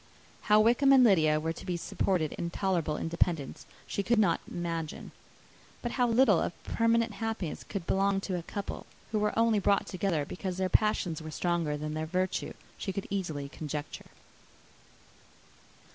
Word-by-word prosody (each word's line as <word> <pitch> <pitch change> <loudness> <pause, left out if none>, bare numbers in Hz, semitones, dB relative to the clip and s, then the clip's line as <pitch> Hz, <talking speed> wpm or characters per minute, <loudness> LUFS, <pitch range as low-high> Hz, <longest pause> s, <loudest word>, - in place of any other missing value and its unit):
How 210 0 +7
Wickham 240 +5 +4
and 265 -2 +8
Lydia 155 -9 +4
were 160 +1 -2
to - - -10
be 180 -2 -2
supported 170 -2 0
in 170 - -3
tolerable 170 -5 -1
independence 165 -3 -1 0.2
she - - -2
could 235 +4 +1
not 195 -6 +3
imagine. 165 -2 -4 0.7
But 240 - -2
how 245 -1 +2
little 230 -5 +5
of - - -1
permanent 230 0 +2
happiness 205 -5 -4
could 195 -5 -5
belong 195 +1 +2
to 190 -2 -3
a 175 - -2
couple 200 +4 -6 0.2
who 215 - +1
were 210 +1 0
only 225 -2 +4
brought 200 0 +2
together 180 -5 -1
because 185 +3 -5
their 185 0 0
passions 185 -7 +1
were 155 - -7
stronger 165 -2 -1
than 150 +1 -4
their 155 0 -3
virtue, 185 +2 -1 0.3
she 195 - -3
could 195 +1 -4
easily 160 -8 -2
conjecture. 150 0 -6
185 Hz, 160 wpm, -30 LUFS, 160-210 Hz, 0.7 s, and